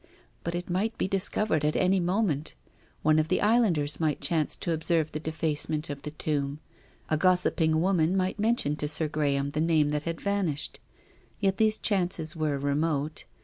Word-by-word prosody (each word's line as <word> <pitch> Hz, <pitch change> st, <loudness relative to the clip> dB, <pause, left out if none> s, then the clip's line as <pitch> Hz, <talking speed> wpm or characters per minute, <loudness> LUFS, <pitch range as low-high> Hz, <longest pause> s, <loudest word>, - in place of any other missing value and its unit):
But 170 Hz, +1 st, -3 dB
it 175 Hz, +1 st, -4 dB
might 195 Hz, +6 st, -1 dB
be -, -, 0 dB
discovered 195 Hz, -3 st, +1 dB
at 150 Hz, +1 st, +1 dB
any 185 Hz, +1 st, +3 dB
moment. 175 Hz, -4 st, 0 dB, 0.5 s
One 155 Hz, 0 st, +4 dB
of 155 Hz, -, +1 dB
the -, -, +1 dB
islanders 200 Hz, -10 st, +2 dB
might 155 Hz, -3 st, 0 dB
chance 160 Hz, -3 st, 0 dB
to 170 Hz, -, -3 dB
observe 160 Hz, -1 st, 0 dB
the 155 Hz, -, -4 dB
defacement 155 Hz, -1 st, -2 dB
of 140 Hz, -1 st, -7 dB
the 150 Hz, -, -5 dB
tomb. 145 Hz, -2 st, -2 dB, 0.5 s
A 155 Hz, -, +3 dB
gossip 180 Hz, +1 st, +2 dB
ing 160 Hz, 0 st, +3 dB
woman 180 Hz, 0 st, +2 dB
might 185 Hz, +2 st, -1 dB
mention 215 Hz, -9 st, +1 dB
to 150 Hz, -, -2 dB
Sir 155 Hz, +1 st, +1 dB
Graham 140 Hz, -2 st, 0 dB
the 150 Hz, -, -1 dB
name 160 Hz, -2 st, +3 dB
that 150 Hz, 0 st, -2 dB
had 165 Hz, -1 st, -3 dB
vanished. 195 Hz, -8 st, -2 dB, 0.6 s
Yet 195 Hz, -2 st, +1 dB
these 215 Hz, 0 st, +3 dB
chances 180 Hz, -6 st, 0 dB
were 155 Hz, -3 st, 0 dB
remote. 145 Hz, +2 st, -1 dB
160 Hz, 180 wpm, -28 LUFS, 150-185 Hz, 0.6 s, One